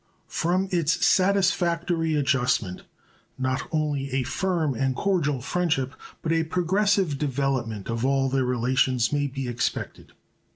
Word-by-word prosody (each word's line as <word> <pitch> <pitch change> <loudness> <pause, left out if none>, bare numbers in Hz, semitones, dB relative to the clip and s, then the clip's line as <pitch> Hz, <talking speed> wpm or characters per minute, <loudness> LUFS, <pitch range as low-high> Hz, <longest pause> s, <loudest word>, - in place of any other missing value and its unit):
From 180 +3 +1
its 170 -1 +2
satisfactory 175 -4 +2
adjustment 130 -9 +1 0.6
not 130 0 -1
only 150 -3 -1
a 135 -1 +1
firm 165 +2 -1
and 130 +2 -1
cordial 150 -9 0
friendship, 145 -3 -1 0.3
but 165 - -1
a 165 0 +2
progressive 180 -1 +1
development 130 -7 -1
of 115 0 -2
all 135 0 +2
their 135 0 +1
relations, 125 0 +1
may 145 -1 +1
be 135 -1 -5
expected. 120 0 -3
140 Hz, 125 wpm, -25 LUFS, 130-170 Hz, 0.6 s, its